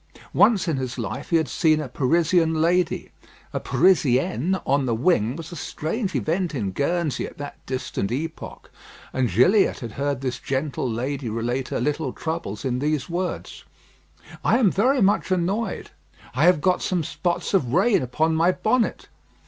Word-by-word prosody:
Once 205 -6 +4
in 160 -4 0
his 130 -2 -4
life - - -5
he 170 - +2
had 160 -2 0
seen 155 -2 +2
a 150 - -4
Parisian 160 +5 +2
lady. 175 +3 +1 0.4
A - - -1
Parisienne 155 - +2
on 140 0 +1
the 115 - +1
wing 120 - +2
was 165 +1 -8
a - - -7
strange 185 - -3
event 170 0 -1
in 100 -7 -2
Guernsey 150 - -1
at - - -13
that 145 0 -8
distant 130 -6 -3
epoch; 160 +6 -6 0.4
and 130 -2 +1
Gilliatt 130 - +3
had 115 -3 -6
heard 140 +1 -2
this 130 -2 -3
gentle 135 -2 -2
lady 130 +2 -3
relate 120 +4 -2
her - - -2
little 145 +1 -1
troubles 160 -11 -4
in 125 -1 0
these 150 +3 -1
words: 180 +1 -4 0.8
"I 230 - +4
am 220 -8 +4
very 250 +4 +2
much 195 0 +2
annoyed; 190 +4 -1 0.4
I 145 +6 +2
have 180 -4 +5
got 185 +1 +2
some 180 -3 0
spots 170 +6 -2
of 135 -12 +2
rain 195 - +3
upon 155 +6 0
my 165 +3 +4
bonnet. 225 +5 0
155 Hz, 165 wpm, -23 LUFS, 130-180 Hz, 0.8 s, have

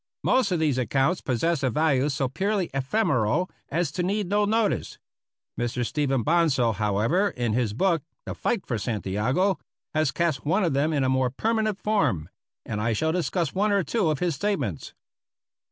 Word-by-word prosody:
Most 255 -7 +2
of 180 - +2
these 150 -5 +1
accounts 135 +7 +1
possess 140 +5 0
a 130 - +1
value 145 0 +2
so 135 -1 0
purely 195 +7 -1
ephemeral 140 - +1 0.2
as 170 +3 0
to 180 - -2
need 200 +3 0
no 205 +1 +2
notice. 220 0 0 0.6
Mr. 120 0 -1
Stephen 135 -2 0
Bonsal, 150 -8 +2
however, 110 - +1
in 120 - -2
his 115 -3 0
book, 170 - +1 0.2
"The - - -4
Fight 225 -7 -1
for 115 -4 -2
Santiago," 115 - 0 0.3
has 155 -2 +2
cast 165 -6 -1
one 175 +8 +1
of 170 - +1
them 145 +4 +1
in 145 -3 +1
a - - +2
more 130 -1 +2
permanent 215 - -1
form; 200 - +1 0.4
and 105 -1 -3
I 115 +1 +1
shall 160 +9 0
discuss 170 -2 -1
one 205 +2 +1
or 200 -2 +2
two 170 +3 0
of 155 - 0
his 175 +2 0
statements. 140 - -3
155 Hz, 175 wpm, -25 LUFS, 125-185 Hz, 0.6 s, Most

